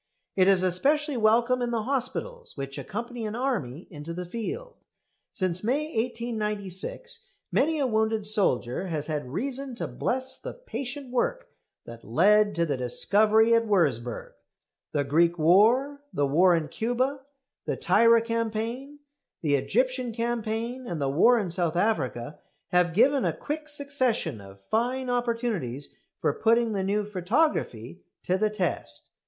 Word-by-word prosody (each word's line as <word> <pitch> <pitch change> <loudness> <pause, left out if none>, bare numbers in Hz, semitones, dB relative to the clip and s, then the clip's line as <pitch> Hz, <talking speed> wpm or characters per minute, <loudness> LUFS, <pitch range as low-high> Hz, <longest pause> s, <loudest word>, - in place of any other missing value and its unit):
It 185 -1 +4
is 190 -2 +4
especially 285 - +1
welcome 235 +3 +3
in 240 - 0
the 230 -2 -1
hospitals 275 - -3
which 140 +1 -5
accompany 235 - -5
an 215 - -5
army 200 - -2
into 155 +1 -7
the 180 0 -5
field. 235 - -6 0.5
Since 185 -1 -2
May 265 +7 +1
1896 225 - -2 0.2
many 315 +3 +2
a 285 - +1
wounded 220 -2 0
soldier 190 - +1
has 155 -4 -3
had 150 -5 -4
reason 265 - -3
to - - -3
bless 260 +1 -3
the - - -7
patient 280 - -6
work - - -1 0.4
that 115 -1 -11
led 205 - +3
to 170 0 +1
the 145 -4 -1
discovery 210 - +4
at 230 0 +3
Würzburg. 135 - 0 0.6
The 145 - 0
Greek 165 +5 +2
war, 230 - +4
the 145 - 0
war 175 +6 +4
in 160 -2 -1
Cuba, 255 +5 -1 0.5
the - - -2
Tirah 230 0 +4
campaign, 230 +5 -3 0.4
the 150 -2 +1
Egyptian 250 - 0
campaign, 235 +2 -3
and 170 -6 -4
the 140 -1 0
war 235 - +5
in 195 -6 -2
South 175 -2 -1
Africa, 150 - -1 0.3
have 180 -2 +2
given 265 +5 +4
a - - +1
quick 305 +1 -5
succession 260 - 0
of 100 0 -14
fine 245 - -1
opportunities 230 - -2 0.3
for - - +1
putting 230 +3 +2
the 195 -2 -1
new 205 +2 0
photography 185 - -1 0.2
to 185 +1 0
the 215 +1 +2
test. 175 - -4
220 Hz, 145 wpm, -27 LUFS, 170-250 Hz, 0.6 s, war